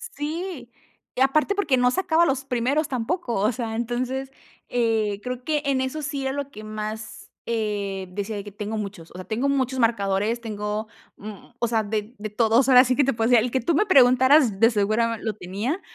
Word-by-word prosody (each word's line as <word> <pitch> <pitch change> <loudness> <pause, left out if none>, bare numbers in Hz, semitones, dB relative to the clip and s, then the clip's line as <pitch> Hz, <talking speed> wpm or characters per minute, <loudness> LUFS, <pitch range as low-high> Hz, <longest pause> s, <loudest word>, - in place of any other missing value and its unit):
Sí, 305 -4 -5 0.4
y 255 - -2
aparte 305 +9 +3
porque 305 -10 +2
no 250 0 +3
sacaba 340 0 +2
los 270 -3 -1
primeros 270 +5 0
tampoco. 250 +1 -2
O 205 +4 +2
sea, 230 -2 -4
entonces, 255 +3 -3 0.4
eh, 220 -4 0
creo 250 0 -5
que 300 0 0
en 270 -2 +1
eso 260 +4 -3
sí 290 -1 -3
era 265 - -1
lo 280 0 -4
que 215 - -10
más, 215 0 -6 0.2
eh, 205 -4 -2
decía, 205 +2 -4
de 200 - -5
que 205 - -8
tengo 210 +2 -4
muchos. 200 -5 -7
O - - -16
sea, 185 0 -8
tengo 245 +6 -1
muchos 260 -2 0
marcadores. 215 -1 +1
Tengo, 210 -1 -4 0.3
mm, 210 -1 -10
o 235 - +1
sea, 225 -1 +1
de 215 +2 -4
de 215 +1 -5
todos. 230 +4 +3
Ahora 255 0 +8
sí 255 +1 +1
que 285 - +3
te 275 - +1
puedo 225 +1 0
decir 235 -3 +5
el 245 - -2
que 260 - +1
tú 295 +7 0
me 375 - +3
preguntaras, 260 - +5
de 230 +2 +5
seguro 220 +2 +1
lo 220 - -2
tenía. 210 - -4
235 Hz, 205 wpm, -24 LUFS, 215-265 Hz, 0.4 s, Ahora